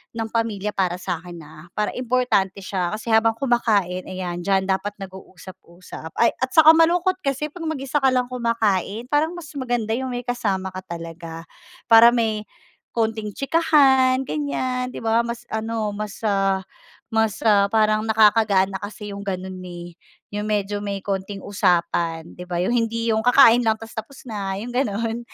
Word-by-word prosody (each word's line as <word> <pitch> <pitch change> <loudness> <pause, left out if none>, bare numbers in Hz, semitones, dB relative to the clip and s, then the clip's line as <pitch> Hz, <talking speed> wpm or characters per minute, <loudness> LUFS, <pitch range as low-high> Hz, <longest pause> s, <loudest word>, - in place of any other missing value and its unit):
ng 225 -1 -3
pamilya 210 -3 -1
para 185 -3 0
sakin 175 -2 -6
ah 155 +2 -14
para 210 - 0
importante 235 -6 0
siya 185 +1 -2
kasi 225 +1 -5
habang 225 0 +4
kumakain 215 -8 0
ayan 180 -2 -4
dyan 190 +2 +1
dapat 195 +2 -2
nag-usap-usap 185 -3 -11
ay - - +4
at 260 - 0
saka 315 0 +9
malungkot 345 +3 +3
kasi 280 0 -2
kapag 330 0 -6
mag-isa 290 -2 -1
ka 265 - +3
lang 250 0 0
kumakain 230 -1 -1
parang 315 +4 +1
mas 315 -6 -9
maganda 240 -4 -1
yung 260 +3 -1
may 245 - -4
kasama 195 -6 -2
ka 185 - -6 0.2
talaga. 165 0 -8 0.5
Para 230 +1 +8
may 215 -3 -1 0.4
konting 220 -2 -1
tsikahan 270 - +3
ganyan 255 -4 -2
'di - - -7
ba 225 +1 +2
mas 235 0 -6
ano 220 -1 -3
mas 210 0 -6
ah 195 -1 +1 0.5
mas 220 -1 0 0.3
parang 215 -1 +2
nakakagaan 215 -3 +4
na 195 +1 -7
kasi 205 -1 -7
yung 200 - -7
ganun 185 -1 -5
eh 175 -1 -9 0.3
yung 205 0 -4
medyo 205 -1 -2
may 200 -1 -3
konting 195 0 -4
usapan 170 -4 0
'di 180 - -8
ba 175 -1 -3
yung 190 +7 +1
hindi 230 0 0
yung 220 - 0
kakain 245 -1 +6
lang 220 -1 +1
tapos 225 0 -11
tapos 225 +5 -7
na 200 -3 -4
yung 240 +3 -7
ganun. 230 -1 -1
215 Hz, 165 wpm, -22 LUFS, 190-245 Hz, 0.5 s, saka